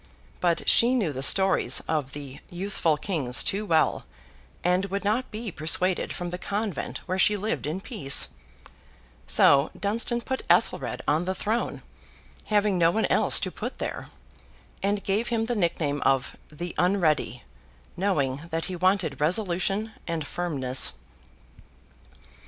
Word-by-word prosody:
But 170 -2 0
she 240 +2 +6
knew 195 - 0
the 130 - -5
stories 190 +6 +4
of 145 -4 -3
the 140 -2 -8
youthful 175 -4 -1
kings 145 -9 -1
too 205 +1 -2
well, 160 -3 +2 0.6
and 180 +2 +2
would 200 +1 -4
not 220 +6 0
be 220 -1 -5
persuaded 180 +4 +1
from 175 -1 -5
the 180 - -5
convent 200 - -3
where 185 +1 -2
she 210 +2 +4
lived 210 -6 -3
in 160 +5 -3
peace; 160 - +1 1.0
so, 140 - +5
Dunstan 230 +4 0
put 260 +2 -3
Ethelred - - +1
on 155 +4 +1
the 190 +1 -2
throne, 225 +5 -2 0.6
having 205 -3 +1
no 165 -1 +5
one 220 +6 +1
else - - +4
to - - -2
put - - -6
there, - - -5 0.7
and 200 +1 0
gave 205 +4 0
him 225 -1 0
the 240 - -1
nickname 165 -7 -1
of 135 -1 +1 0.2
The 175 +3 -6
Unready—knowing 145 - -1
that 165 -1 -2
he 185 - -4
wanted 185 -6 0
resolution 195 +5 +1 0.2
and 165 -3 -3
firmness. 140 -7 +1
180 Hz, 140 wpm, -26 LUFS, 150-205 Hz, 1.0 s, she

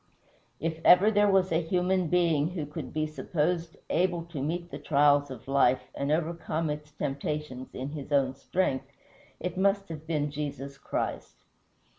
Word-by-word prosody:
If 160 +1 -2
ever 195 +4 +7
there 205 -1 +4
was 190 -2 +3
a 165 +1 +3
human 180 +1 +1
being 165 -3 +3
who 175 -4 -4
could 150 - -7
be 155 0 0
supposed 165 +2 -2
able 175 -1 +1
to 140 - -3
meet 170 +4 -3
the - - -6
trials 145 -1 +3
of 130 -3 -9
life 135 -2 +2
and 140 +1 -2
overcome 160 0 -1
its 150 0 -6
temptations 140 -2 -4
in 130 +2 -4
his 145 -1 -7
own 135 -2 +3
strength, 135 -1 -1 0.5
it 180 0 -4
must 195 0 +2
have 160 -1 -8
been 150 -3 0
Jesus 140 -2 -5
Christ. - - -3
155 Hz, 160 wpm, -29 LUFS, 145-175 Hz, 0.5 s, ever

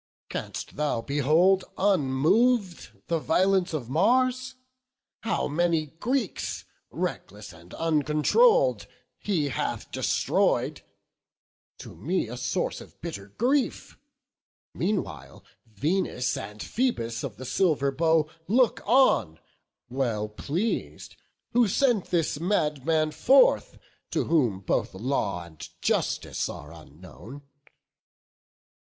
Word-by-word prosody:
canst - - -6
thou 150 -5 0
behold 155 +9 +3
unmov'd 190 - +2 0.2
The 165 -1 0
violence 185 +3 +2
of 145 -7 -4
Mars? 255 - +1 0.6
how 225 - -1
many 165 +1 +1
Greeks, 245 -3 -2 0.2
Reckless 105 0 -5
and 85 +2 -16
uncontroll'd, 165 - +3 0.3
he 165 -8 0
hath - - -3
destroy'd; - - 0 1.0
To - - -11
me 180 -4 -1
a 120 - -7
source 125 - -2
of - - -15
bitter 100 0 -6
grief; 265 +4 0 0.8
meanwhile 205 -2 -3 0.2
Venus 125 - -1
and 105 0 -7
Phoebus 115 - -1
of - - -6
the 130 - -8
silver 145 -2 +1
bow 160 +2 +2 0.2
Look 240 +4 +3
on, 205 - +4 0.5
well 120 -5 -1
pleas'd, 160 - -3 0.4
who 240 -1 +4
sent 230 -1 +2
this 165 -4 0
madman 155 -3 +1
forth, - - +4 0.4
To - - +1
whom 120 - +1
both 95 - -1
law 100 -5 -2
and 80 -2 -11
justice - - -1
are 75 +3 -9
unknown. 90 - -13
155 Hz, 100 wpm, -26 LUFS, 125-205 Hz, 1.0 s, on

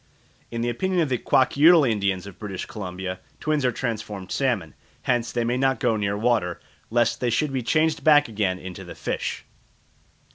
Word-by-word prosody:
In 115 0 -4
the 120 - 0
opinion 185 +10 0
of 155 - 0
the 125 -2 0
Kwakiutl 150 +3 +5
Indians 100 -4 0
of 100 -3 -11
British 100 -4 -5
Columbia 95 -4 -6 0.2
twins 155 -2 0
are 125 - +3
transformed 105 -6 -4
salmon; 115 - 0 0.3
hence 120 -2 0
they 120 - 0
may 120 +2 0
not 135 0 +1
go 120 -3 +2
near 100 -1 -1
water, 105 -6 +1 0.3
lest 120 0 +2
they 125 - 0
should 135 +4 0
be 130 - 0
changed 155 +6 +1
back 150 -2 +6
again 100 -5 -1
into 95 -1 -8
the - - -10
fish. - - -3
120 Hz, 180 wpm, -24 LUFS, 100-135 Hz, 0.3 s, back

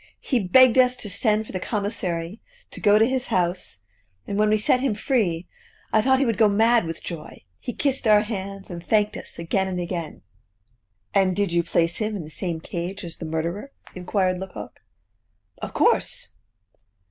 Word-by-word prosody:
He 255 - 0
begged 250 +6 +6
us 250 0 +5
to 215 -5 -4
send 215 +2 +1
for - - -10
the 185 - -3
commissary, 195 -3 -3 0.3
to - - -8
go 205 0 +5
to 220 - +5
his 260 +1 -1
house, 175 - -1 0.4
and 200 - -4
when 210 +1 +3
we 215 - +4
set 215 +4 +2
him 255 -5 0
free, 200 - 0 0.5
I 215 - +5
thought 265 +3 +4
he 275 - +2
would 230 -5 -1
go 215 -2 +6
mad 225 +1 +4
with 165 0 -6
joy; 165 -3 -8 0.2
he 250 - -4
kissed 270 -1 -1
our 210 -1 +6
hands, 195 -3 -6
and 170 -1 -7
thanked 210 0 +2
us - - -7
again 190 +3 0
and 185 -1 -3
again!" 170 -3 -5 0.9
"And 190 -2 +3
did 200 -2 0
you 170 0 +3
place 170 0 0
him 215 -1 -2
in 190 - -4
the 155 - -11
same 170 -1 -3
cage 175 +4 -5
as 170 -2 -7
the 165 - -6
murderer?" 170 - -3 0.2
inquired 185 0 0
Lecoq. 185 - -8 0.8
"Of - - -5
course." - - +1
200 Hz, 185 wpm, -24 LUFS, 175-220 Hz, 0.9 s, begged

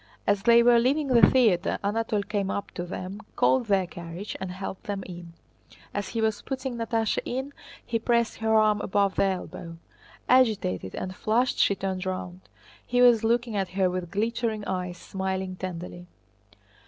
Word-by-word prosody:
As 205 -1 +2
they 235 +1 +6
were 240 0 +6
leaving 275 +4 +1
the 240 -2 +5
theater 215 -8 +3
Anatole 210 0 0
came 200 -1 -2
up 200 0 -3
to 175 - -5
them, 185 +3 -6
called 255 -3 +3
their 195 -2 +2
carriage, 175 +3 -7
and 190 - -3
helped 190 +3 -7
them 200 -3 -3
in. 175 -2 -9 0.6
As 205 -1 -3
he 230 - -2
was 220 -1 0
putting 265 -2 -4
Natásha 225 -1 0
in 265 +3 -4 0.3
he 230 - -1
pressed 235 0 +1
her 220 0 +1
arm 215 -1 +4
above 200 0 +1
the - - +2
elbow. 180 -3 -4 0.5
Agitated 215 - +2
and 185 0 -5
flushed 235 +6 +1
she 200 - +4
turned 190 -1 -3
round. 185 -1 -5 0.4
He 245 - -1
was 240 -3 +6
looking 235 0 +1
at 195 -2 -1
her 185 -2 +3
with 180 -1 -4
glittering 220 +1 -1
eyes, 180 -1 -3
smiling 190 +1 -3
tenderly. 175 -1 -7
205 Hz, 165 wpm, -26 LUFS, 185-235 Hz, 0.6 s, they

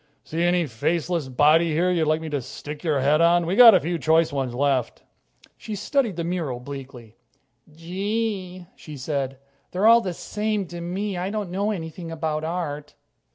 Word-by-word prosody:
See 165 +2 -4
any 175 0 +2
faceless 160 +5 -1
body 155 +5 +3
here 175 +4 +2
you'd 165 -3 +1
like 155 +1 +1
me 160 - -5
to 145 -2 -1
stick 145 +4 -9
your 150 -5 +1
head 150 +4 +3
on? 170 0 +4
We've 175 +3 -1
got 230 -2 +10
a - - +5
few 170 +1 -3
choice 160 +2 +2
ones 130 -3 -2
left." 135 -2 0 0.6
She 215 - -6
studied 230 0 0
the 170 - -3
mural 165 -8 -3
bleakly. 125 -4 -10 0.5
"Gee," 185 +2 -3
she 150 -2 -10
said, 135 -1 -3 0.3
"they're 185 +3 -1
all 230 +1 +7
the 185 -5 -3
same 210 +1 -2
to 175 0 -7
me. 190 +3 -3
I 185 +2 -2
don't 205 -3 -4
know 200 +3 -1
anything 165 -3 -5
about 155 -1 -3
art." 150 -3 -4
165 Hz, 180 wpm, -24 LUFS, 145-185 Hz, 0.6 s, got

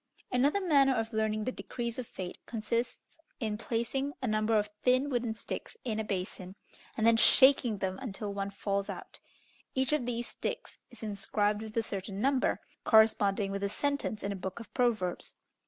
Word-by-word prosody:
Another 275 +9 +3
manner 280 -7 +4
of 225 0 -2
learning 215 0 0
the 255 - -1
decrees 235 -1 -4
of 245 - -5
fate 180 -1 -6
consists 230 +5 -3 0.2
in 220 -3 -1
placing 240 +5 -2
a 260 - -3
number 215 -1 +2
of 210 - +2 0.2
thin 255 +3 +3
wooden 240 -3 0
sticks 340 - -6
in 220 -3 -2
a - - 0
basin, 185 -2 -4 0.4
and 220 - +1
then 230 0 +6
shaking 260 -2 +6
them 190 0 -2
until 210 -4 -4
one 200 0 -2
falls 200 0 -2
out. - - -7 0.6
Each 265 +2 +2
of 255 -5 +1
these 240 -1 -2
sticks - - -5
is 240 - -13
inscribed 210 0 0
with 220 0 -7
a 225 - +3
certain 195 -2 -5
number, 270 +3 +2 0.2
corresponding 210 -3 +4
with 200 0 -3
a 200 - +1
sentence 280 -3 -1
in 200 - -1
a - - -2
book 190 +2 -5
of 230 - -11
proverbs. 220 -8 0
220 Hz, 180 wpm, -31 LUFS, 200-250 Hz, 0.6 s, then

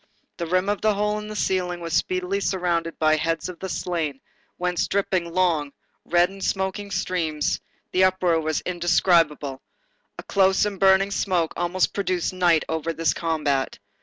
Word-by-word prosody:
The 170 - -3
rim 185 +3 +1
of 205 0 -1
the 215 -1 +2
hole 210 +1 0
in 210 - -7
the 215 - -7
ceiling 180 -3 -1
was 165 -1 -5
speedily 185 +2 0
surrounded 175 -4 -1
by 155 0 +3
heads 165 +2 -1
of 180 - -9
the 190 - -5
slain, 160 -7 -2 0.4
whence 180 -1 0
dripped 200 0 -1
long, 170 -4 +1 0.3
red 175 +1 +4
and 195 0 -9
smoking 190 +2 -2
streams, 175 -6 -1 0.3
the 185 +1 +4
uproar 180 -3 +2
was 155 -1 -1
indescribable; 170 -5 +1 0.6
a - - -7
close 190 0 +3
and 200 -2 -4
burning 195 +1 +4
smoke 180 -5 0
almost 175 +1 0
produced 185 -3 -1
night 175 -3 +3
over 160 +1 -2
this 165 -2 +1
combat. 150 -5 -1
180 Hz, 165 wpm, -24 LUFS, 165-190 Hz, 0.6 s, red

